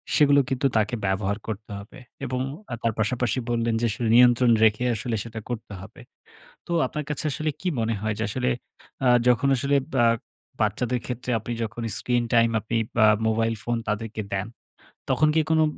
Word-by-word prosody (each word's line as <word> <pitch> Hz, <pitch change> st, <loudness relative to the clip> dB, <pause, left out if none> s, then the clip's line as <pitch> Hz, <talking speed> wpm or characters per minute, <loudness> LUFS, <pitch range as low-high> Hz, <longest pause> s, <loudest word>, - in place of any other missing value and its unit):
সেগুলো 145 Hz, -1 st, +5 dB
কিন্তু 135 Hz, +1 st, +1 dB
তাকে 110 Hz, +2 st, +1 dB
ব্যবহার 95 Hz, +1 st, 0 dB
করতে 110 Hz, -1 st, -6 dB
হবে। 100 Hz, +6 st, -12 dB, 0.3 s
এবং 125 Hz, 0 st, -2 dB, 0.3 s
আ -, -, -2 dB
তার 115 Hz, -2 st, 0 dB
পাশাপাশি 125 Hz, +2 st, 0 dB
বললেন 115 Hz, -1 st, 0 dB
যে -, -, +2 dB
আসলে 115 Hz, +2 st, -2 dB
নিয়ন্ত্রণ 120 Hz, 0 st, +6 dB
রেখে 110 Hz, +2 st, +3 dB
আসলে 115 Hz, +1 st, -2 dB
সেটা 115 Hz, -1 st, -7 dB
করতে 110 Hz, -3 st, -5 dB
হবে। -, -, -12 dB, 0.7 s
তো -, -, -6 dB, 0.2 s
আপনার 150 Hz, -, -4 dB
কাছে 150 Hz, -, -1 dB
আসলে 155 Hz, +4 st, -1 dB
কী 185 Hz, -, -3 dB
মনে 115 Hz, 0 st, 0 dB
হয়? 110 Hz, 0 st, -1 dB
যে -, -, 0 dB
আসলে -, -, -1 dB, 0.6 s
আ -, -, +4 dB, 0.2 s
যখন 125 Hz, +2 st, +4 dB
আসলে 140 Hz, +3 st, +1 dB, 0.2 s
বা 120 Hz, -2 st, +4 dB, 0.6 s
বাচ্চাদের 120 Hz, +4 st, 0 dB
ক্ষেত্রে 125 Hz, 0 st, -4 dB
আপনি 115 Hz, +2 st, -5 dB
যখন 115 Hz, +2 st, -5 dB, 0.2 s
স্ক্রিন-টাইম 120 Hz, -1 st, +2 dB
আপনি 110 Hz, +2 st, -4 dB, 0.3 s
আ -, -, +7 dB, 0.2 s
মোবাইল 115 Hz, +1 st, +1 dB
ফোন 120 Hz, 0 st, -1 dB
তাদেরকে 110 Hz, +1 st, -3 dB
দেন, 100 Hz, +1 st, -1 dB, 0.6 s
তখন 155 Hz, -, +3 dB
কি 160 Hz, -, +5 dB
কোনো 160 Hz, 0 st, +4 dB
115 Hz, 175 wpm, -25 LUFS, 110-125 Hz, 0.7 s, আ